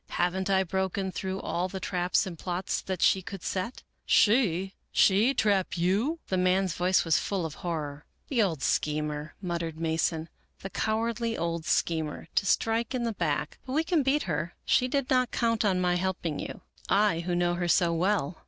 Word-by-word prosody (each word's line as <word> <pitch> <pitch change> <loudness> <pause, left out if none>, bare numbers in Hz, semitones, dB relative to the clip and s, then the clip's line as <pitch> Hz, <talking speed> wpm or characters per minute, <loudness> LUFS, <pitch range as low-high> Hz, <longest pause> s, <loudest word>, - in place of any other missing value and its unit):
" - - -46
Haven't 185 +2 0
I 190 -1 +3
broken 190 +1 -2
through 190 +1 -3
all 180 +2 -2
the 190 - -5
traps 180 +2 0
and 185 -3 -6
plots 180 +2 -3
that 185 -3 -3
she 190 - +4
could 190 0 -8
set? 190 +6 -3
" - - -47
" - - -50
She? 195 -5 +3 0.2
She 215 +8 +4
trap 195 -4 +1
you? 200 - +1
" - - -47
The 185 - +1
man's 185 0 +2
voice 180 +2 +2
was 165 -2 +3
full 195 -4 -2
of 160 - -5
horror, 150 -4 -4
" - - -44
The 250 -5 +2
old 165 -9 0
schemer," 150 0 -1
muttered 170 -3 -3
Mason. 160 0 0 0.2
" - - -42
The 195 - -5
cowardly 230 +1 -1
old 170 -1 -2
schemer, 160 -1 -1
to 200 - +1
strike 225 +5 +1
in 245 - -1
the 230 -1 -1
back; 150 -5 -2
but 260 - -6
we 310 +3 +2
can 330 -2 +2
beat 275 +2 +2
her. 165 0 -3
She 250 - +3
did 275 0 0
not 255 -1 +3
count 230 -2 +1
on 190 -3 +2
my 180 -1 +2
helping 175 -4 -2
you - - -6 0.2
— - - -35
I, 200 -4 +3
who 175 +1 -2
know 175 0 +2
her 175 0 -1
so 170 0 +3
well." 180 -2 0
185 Hz, 210 wpm, -28 LUFS, 170-210 Hz, 0.2 s, she